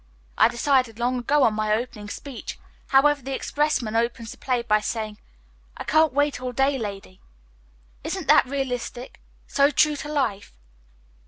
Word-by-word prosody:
I - - +6
decided 250 -2 +1
long 245 +1 0
ago 280 +4 +2
on 225 - +4
my 215 0 -1
opening 215 -2 -2
speech, 275 +3 -7 0.3
however. 285 +2 +4
The 270 +1 -4
expressman 290 -8 -1
opens 230 -1 -1
the - - -11
play 250 -3 -1
by 215 -2 +3
saying, 215 -1 -4 0.6
'I - - -5
can't 315 -1 +3
wait 290 -1 +1
all 250 -1 -4
day, 270 +2 +1
lady.' 200 -3 -7 0.8
Isn't - - -4
that - - +6
realistic? 255 -2 -4 0.2
So 280 0 +3
true 300 +1 +3
to 295 +1 -6
life!" 235 - -2
250 Hz, 155 wpm, -24 LUFS, 225-280 Hz, 0.8 s, I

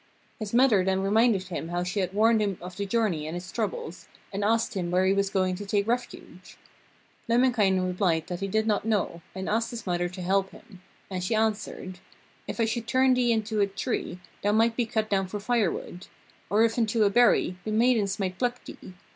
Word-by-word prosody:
His 215 -2 -5
mother 235 -6 +4
then 190 0 0
reminded 210 0 +3
him 165 -2 -4
how 175 +1 -2
she 185 +3 -2
had 185 -2 -1
warned 220 +2 +3
him 200 -3 -1
of 180 +1 -9
the 200 0 -3
journey 195 -9 0
and 165 +3 -4
its 175 0 -8
troubles, 185 -5 -4 0.3
and 200 +1 -2
asked 225 +2 +1
him 180 -4 -2
where 180 +2 +2
he 190 - +3
was 200 0 +1
going 185 -1 +1
to 205 - -6
take 200 0 +1
refuge. 240 +1 -5 0.7
Lemminkainen 225 -6 +3
replied 180 -3 0
that 175 -1 -5
he 195 - -2
did 220 +3 0
not 210 -2 +1
know, 205 -6 -1
and 190 0 -5
asked 225 +2 0
his 235 -1 -7
mother 175 -1 -1
to 185 +1 -8
help 195 +1 +1
him, 190 -4 -16 0.3
and 185 -1 -3
she 200 +5 0
answered: 210 -4 -2 0.5
'If - - -5
I 230 - +3
should 230 +1 -3
turn 260 +1 +4
thee 250 -1 +2
into 220 -1 0
a 200 - +3
tree, 195 -2 -3 0.2
thou 205 +1 +1
might 225 +1 +3
be 240 -2 0
cut 220 -1 -1
down 195 -2 0
for 205 +3 -5
firewood. 205 -5 -2 0.4
Or 210 +2 +4
if 230 +1 +1
into 225 -1 +2
a 200 - +3
berry, 225 -5 +3
the - - -4
maidens 220 -3 +2
might 185 -2 -3
pluck 245 0 -2
thee. 185 - -11
205 Hz, 215 wpm, -27 LUFS, 185-225 Hz, 0.7 s, mother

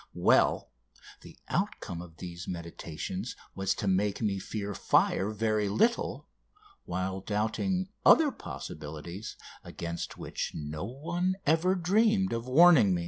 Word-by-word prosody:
Well, - - +3 0.5
the - - -13
outcome 85 - -2
of 85 -2 -12
these 85 -1 -7
meditations 85 +4 -5 0.2
was 95 -1 0
to 105 - -3
make 100 +2 +1
me 100 -4 0
fear 100 +1 -4
fire 95 +1 +2
very 110 -1 0
little, 230 - +1 0.6
while 95 +1 -3
doubting 110 - -1
other 310 -3 +7
possibilities 80 - -7 0.3
against 85 0 -5
which - - -4
no 75 +3 -4
one 170 - -2
ever 165 +5 +3
dreamed 195 +2 +2
of 115 +1 -3
warning 140 - +7
me. - - -1
105 Hz, 125 wpm, -30 LUFS, -, 0.6 s, other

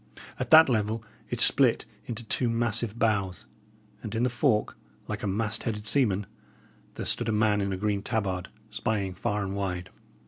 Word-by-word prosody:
At - - -3
that 160 0 +9
level, 110 -2 0 0.3
it 120 - -3
split 125 -3 +4 0.2
into 120 -1 -3
two 120 +2 0
massive 115 -1 0
boughs; 100 -6 0 0.6
and 110 0 -6
in 115 - 0
the 125 - +2
fork, 120 -4 +1 0.3
like - - -4
a - - -2
mast 105 +2 0
headed 105 -3 -4
seaman, 105 -6 +2 0.7
there - - -5
stood - - +2
a - - +2
man 105 -1 +2
in 100 0 -1
a 95 - -2
green 100 0 -1
tabard, 100 -5 -2 0.2
spying 100 -4 -2
far 105 +2 -2
and 95 0 -4
wide. 95 -2 -3
105 Hz, 175 wpm, -27 LUFS, 100-115 Hz, 0.7 s, that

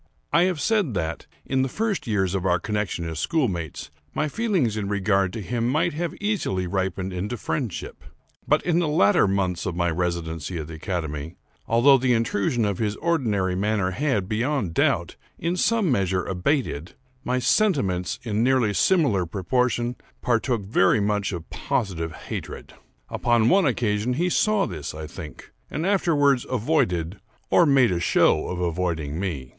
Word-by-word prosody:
I 170 +3 +5
have 185 -4 -1
said 205 - +1
that, 80 -2 -3 0.2
in 135 0 +1
the 130 - 0
first 210 - -2
years 95 -4 0
of 95 -2 -1
our 90 -2 +3
connexion 105 -4 -2
as 80 -1 -4
schoolmates, 90 - -2 0.2
my 150 - 0
feelings 185 - 0
in 100 -2 -3
regard 95 -2 +1
to 110 - -5
him 115 +3 -1
might 155 +5 +1
have 170 +3 -2
been - - -13
easily 190 - -1
ripened 95 0 -2
into 100 +7 -3
friendship; 80 -6 -4 0.4
but, - - +3
in 170 0 +2
the 170 - +1
latter 105 -10 +4
months 95 -2 -1
of 90 - -3
my 85 -1 +1
residence 85 -2 -2
at 85 -4 -4
the 80 - -9
academy, 80 -2 -4 0.3
although 130 +4 +5
the 125 0 +2
intrusion 115 0 +1
of 100 -3 -2
his 105 -2 0
ordinary 110 - 0
manner 100 0 0
had, 110 -4 0
beyond 115 - -1
doubt, - - +1 0.2
in 170 +2 -1
some 210 -2 +2
measure, 95 -5 +1
abated, 90 - -1 0.3
my 125 0 0
sentiments, 120 - +1
in 110 -3 -1
nearly 125 -5 +2
similar 115 - +2
proportion, 120 +7 0 0.3
partook 120 -2 +1
very 95 +1 +3
much 105 0 0
of 85 -3 -6
positive 85 -6 -2
hatred. - - -7 0.4
Upon 120 -2 +2
one 190 -3 +4
occasion 115 -1 0
he 175 +7 0
saw 215 +2 +2
this, 80 -4 -6
I 80 0 -6
think, 75 -1 -10 0.2
and 155 +3 -3
afterwards 145 -9 +3
avoided, 100 - 0 0.3
or 170 - +5
made 135 -6 +4
a 85 - 0
show 85 - +3
of 90 - -4
avoiding 85 -3 -2
me. 75 -10 -4
105 Hz, 165 wpm, -24 LUFS, 90-135 Hz, 0.4 s, I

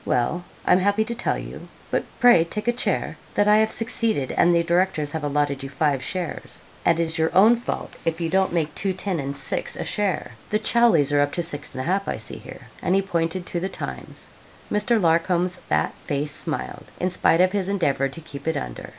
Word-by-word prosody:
Well, 140 +9 0 0.2
I'm 180 - +5
happy 205 +3 +2
to 235 - -4
tell 235 - -1
you - - -8 0.2
but - - +1 0.2
pray 245 -10 +7
take 210 +6 -5
a 240 - +3
chair 245 - -1 0.2
that 205 - +3
I 210 0 +6
have 220 0 +3
succeeded, 225 - +1
and 175 - +4
the 170 - +3
directors 170 -3 +1
have 160 -1 -4
allotted 145 -1 0
you 135 - -6
five 140 -1 0
shares; 180 +1 -5 0.2
and 165 -1 +3
it's 165 -1 0
your 160 0 +3
own 220 +5 +7
fault 235 - -5
if 165 0 -1
you 170 - -1
don't 190 +3 +2
make 160 -3 -1
two 195 -1 -1
ten 185 -2 -1
and 140 0 -3
six 135 - 0
a - - -4
share. 200 -6 -1 0.2
The 210 - +2
Chowsleys 215 - +3
are 145 - +5
up 145 0 0
to 175 - -1
six 145 -3 -5
and 130 - -3
a - - -5
half, 195 +3 0
I - - -2
see - - -6
here,' - - -12
and 180 - +1
he 195 - +2
pointed 175 -1 -1
to 175 - -3
the 190 +3 -2
'Times.' - - -7 0.5
Mr. 210 +2 +2
Larcom's 175 +1 +2
fat 75 - -1
face 145 +1 -2
smiled, 65 - -4
in 180 +1 0
spite 170 -1 +3
of 185 0 +4
his 195 -1 -1
endeavour 145 -8 +1
to 165 - -9
keep 140 -2 -10
it 160 - +1
under. - - -6
170 Hz, 220 wpm, -23 LUFS, 145-195 Hz, 0.5 s, pray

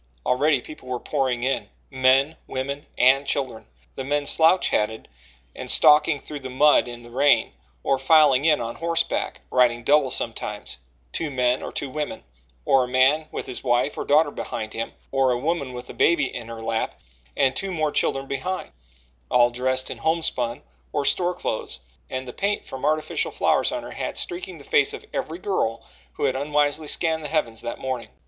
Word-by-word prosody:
Already 140 +1 +2
people 150 -2 -12
were 125 -1 -3
pouring 130 -4 -1
in, 135 +1 -1 0.2
men, 135 +3 +3
women 140 +2 -4
and 135 +2 +4
children 130 - -2 0.3
the - - -5
men 145 +2 -1
slouch 165 +5 +4
hatted 110 +1 -1 0.5
and - - -6
stalking 150 0 +5
through 150 +1 -7
the 130 -1 -7
mud 145 +1 +4
in 120 0 -8
the 120 - -13
rain, 140 +4 +3 0.3
or 135 - +1
filing 140 -1 +5
in 155 -1 +4
on 115 0 -4
horseback 165 0 -1
riding 120 -2 +3
double 145 +1 +4
sometimes 65 - -3 0.3
two 160 - -2
men 125 -2 +1
or - - -6
two 140 - -3
women, 150 0 -4 0.4
or 135 -1 +4
a - - -3
man 135 +5 +3
with - - -5
his 125 - -6
wife 125 +2 +1
or - - -3
daughter 150 +1 +3
behind 110 -5 -5
him, 115 0 -4 0.2
or 135 -1 +2
a 120 - +1
woman 140 0 -2
with 125 0 -8
a - - -9
baby 170 -6 +2
in 120 -2 -6
her 115 -1 -8
lap 110 0 -2 0.4
and 135 -2 +3
two 195 0 -3
more 155 -4 0
children 135 -1 0
behind 180 +8 -4 0.6
all 120 -1 +4
dressed 130 +1 -1
in - - -7
homespun 145 -8 0 0.3
or 140 - -1
store 180 +3 +1
clothes, - - -3 0.3
and 130 0 -4
the 125 - -7
paint 205 +1 -1
from 130 - -8
artificial 155 +1 0
flowers - - +2
on - - -4
her - - -8
hat - - -4
streaking 370 +1 -3
the - - -13
face 430 -2 +3
of 440 - -8
every 215 - -3
girl 180 - -1 0.3
who - - -5
had 135 -2 +2
unwisely 145 +2 0
scanned 160 +1 +1
the - - -3
heavens 130 -8 -1
that 120 - -5
morning. 130 -3 -4
135 Hz, 185 wpm, -24 LUFS, 125-155 Hz, 0.6 s, stalking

